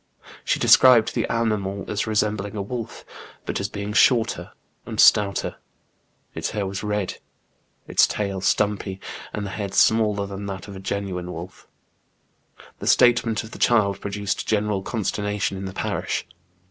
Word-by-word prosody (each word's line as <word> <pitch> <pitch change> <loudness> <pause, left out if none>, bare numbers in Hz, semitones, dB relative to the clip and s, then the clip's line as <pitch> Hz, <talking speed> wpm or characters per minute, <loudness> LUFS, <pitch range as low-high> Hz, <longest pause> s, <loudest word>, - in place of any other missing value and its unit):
She - - +1
described 125 -4 +6
the - - -1
animal 105 -4 -1
as 105 +1 -2
resembling 105 -1 -1
a 100 - -2
wolf, 115 +2 -6 0.4
but - - -2
as 100 - -2
being 100 0 -5
shorter 115 0 +3 0.3
and - - -7
stouter; 100 -1 +4 0.8
its - - -3
hair 105 -2 -2
was 95 0 -4
red, 105 -2 -2 0.7
its - - +4
tail 100 -2 -3
stumpy, 100 0 0 0.3
and 105 - -4
the 100 - -5
head 100 -1 -5
smaller 105 -2 +3
than 100 0 -6
that 95 -2 -6
of 100 - -9
a - - -7
genuine 95 -2 -4
wolf. 90 +2 -9 1.1
The - - -6
statement 120 -3 +4
of 110 - -11
the - - -10
child 105 -5 +2
produced 100 0 -3
general 105 -2 0
con 110 +3 -3
sternation 105 +1 -1
in 95 0 -5
the 95 - -5
parish. - - -2
100 Hz, 155 wpm, -23 LUFS, 100-110 Hz, 1.1 s, described